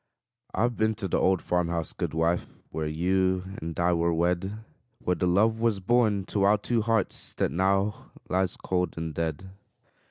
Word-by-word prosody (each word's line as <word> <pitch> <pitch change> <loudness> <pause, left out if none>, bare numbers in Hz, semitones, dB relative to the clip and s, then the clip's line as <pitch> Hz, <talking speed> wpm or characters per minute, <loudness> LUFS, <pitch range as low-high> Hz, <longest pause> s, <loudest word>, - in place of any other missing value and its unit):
I've 120 +4 +1
been 110 0 +2
to 105 -2 -4
the - - +1
old 95 -1 +2
farm 90 -1 +1
house, 85 -2 -2
good - - -3
wife, 85 +2 +1 0.2
Where 80 -1 -2
you 95 +3 +1 0.2
and 80 +1 -5
I 85 0 +3
were 85 0 +2
wed; 90 +4 0 0.4
Where 90 - 0
the 90 - 0
love 110 +5 +3
was 115 -3 +1
born 105 -1 +2
to 100 - +1
our 100 +2 +5
two 115 +3 0
hearts 110 -2 -1
That - - 0
now 95 +3 0 0.2
lies 95 0 0
cold 90 -2 -1
and 80 -1 -3
dead. 80 +4 -3
95 Hz, 180 wpm, -27 LUFS, 85-105 Hz, 0.4 s, our